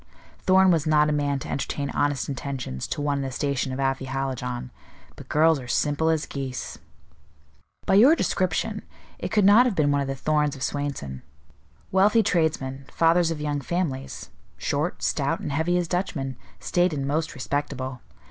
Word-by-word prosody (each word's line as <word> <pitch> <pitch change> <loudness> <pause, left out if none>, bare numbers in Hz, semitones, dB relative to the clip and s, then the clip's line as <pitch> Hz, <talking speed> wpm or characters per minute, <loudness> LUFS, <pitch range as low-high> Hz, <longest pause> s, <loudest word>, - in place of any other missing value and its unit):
Thorn 190 0 +6
was 160 -2 +1
not 150 -1 +4
a - - +1
man 145 -1 0
to - - -7
entertain 140 +1 -2
honest 145 -1 0
intentions 130 - -4
to - - -3
one 145 -1 0
in - - -2
the 135 - -3
station 135 0 -1
of 130 - -4
Afy 135 0 0
Hallijohn; 130 -2 -3 0.4
but - - -12
girls 160 0 +4
are 125 - -9
simple 145 +5 +1
as 160 -1 +1
geese." 135 -3 -5 1.1
"By - - +2
your 245 +11 +7
description, - - -1 0.4
it - - -3
could 210 -3 +3
not 220 +6 +7
have 225 - -1
been 145 -3 +2
one 140 0 +2
of 140 - -2
the 135 - -2
Thorns 150 +1 +1
of 130 - -6
Swainson. 135 - -3 0.7
Wealthy 205 +4 +4
tradesmen, 150 -8 0
fathers 165 +1 +3
of 165 -2 -3
young 145 -1 -1
families, 140 -4 -3 0.3
short, - - -2
stout, - - 0
and - - -4
heavy 160 +5 +1
as 175 -1 0
Dutchmen, 155 -7 -2 0.2
staid 175 -1 +1
and 140 -2 -2
most 155 +2 -1
respectable. 130 -2 -3
145 Hz, 175 wpm, -25 LUFS, 135-165 Hz, 1.1 s, your